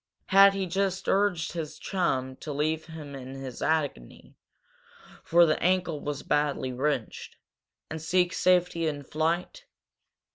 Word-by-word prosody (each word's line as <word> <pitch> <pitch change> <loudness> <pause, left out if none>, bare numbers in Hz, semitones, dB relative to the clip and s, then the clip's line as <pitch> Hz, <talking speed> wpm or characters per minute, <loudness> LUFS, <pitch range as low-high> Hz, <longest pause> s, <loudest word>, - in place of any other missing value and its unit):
Had 195 0 +7
he 195 -1 -2 0.4
urged 195 -4 +1
his 160 -3 -5
chum 130 -9 -1
to 155 - -7
leave 155 +2 -1
him 155 -3 -9
in 135 0 -8
his 135 -2 -8
agony, 145 - -2 0.9
for 170 +1 +5
the 155 - 0
ankle 180 -3 +1
was 145 -1 -5
badly 145 -3 0
wrenched, 130 -3 -3 0.5
and 160 0 -6
seek 175 +2 +1
safety 180 -2 +2
in 145 -2 -3
flight? 160 +5 -2
160 Hz, 130 wpm, -27 LUFS, 145-175 Hz, 0.9 s, Had